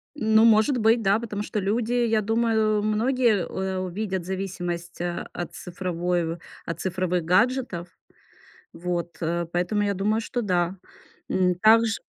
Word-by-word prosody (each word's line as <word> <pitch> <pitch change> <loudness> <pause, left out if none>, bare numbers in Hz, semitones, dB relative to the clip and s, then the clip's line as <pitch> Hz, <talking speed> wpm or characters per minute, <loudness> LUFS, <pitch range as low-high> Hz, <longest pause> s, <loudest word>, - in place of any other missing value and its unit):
Ну, 220 -3 +4
может 225 +4 +4
быть, 225 +1 +3
да. 200 +1 +3
Потому 210 -3 -4
что 210 - -3
люди, 220 +4 0
я 230 -3 +2
думаю, 220 -1 +1
многие, 220 -1 +2
э, 190 0 -3
увидят 185 0 -3
зависимость, 175 -3 -4
а, 175 0 -3
от 175 - -5
цифровой 175 -1 -2
в - - -16 0.3
от 165 - -5
цифровых 180 -2 -1
гаджетов. 200 -1 +1 0.9
Вот, 175 0 -4
э, 170 +1 -1
поэтому 180 +4 0
я 200 0 0
думаю, 210 +4 0
что 240 +2 -3
да. 180 -1 0 0.5
М, 180 -1 +2
такж 220 +3 +4
195 Hz, 145 wpm, -25 LUFS, 180-220 Hz, 0.9 s, Ну